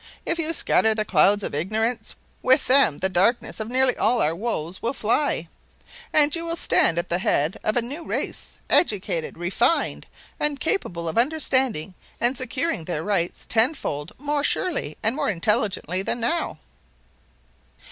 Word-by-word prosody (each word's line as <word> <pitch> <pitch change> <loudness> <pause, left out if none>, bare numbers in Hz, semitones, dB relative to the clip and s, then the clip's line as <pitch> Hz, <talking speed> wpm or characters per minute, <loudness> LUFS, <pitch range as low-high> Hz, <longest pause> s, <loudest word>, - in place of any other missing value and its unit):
If 335 - 0
you 325 0 +4
scatter 220 -8 +2
the 215 -1 -1
clouds 205 0 +3
of - - -3
ignorance, 215 +10 -1 0.3
with 260 +3 +4
them 255 - +4
the 190 - 0
darkness 190 +8 0
of 220 - -4
nearly 255 +1 +3
all 245 - +1
our 155 - +1
woes 185 -4 -4
will 235 +4 -1
fly, 225 - 0 0.6
and 295 0 +5
you 335 - +1
will 335 0 -1
stand 170 - +2
at 170 +1 -1
the 175 - 0
head 155 -2 0
of 215 - 0
a 240 - +3
new 285 +8 -5
race, - - -4
educated, 185 - +1
refined, 200 - 0 0.3
and 295 -2 +1
capable 175 - -2
of 160 - 0
understanding 260 - +1 0.3
and 240 +3 +2
securing 255 - -2
their 160 -3 -3
rights 175 -3 -1
ten 235 +7 +3
fold 145 - -5
more 290 +1 -2
surely 290 - -1
and 220 +3 +2
more - - -1
intelligently 190 -2 -1
than 195 - -2
now." 330 +9 -2
225 Hz, 160 wpm, -23 LUFS, 180-275 Hz, 0.6 s, and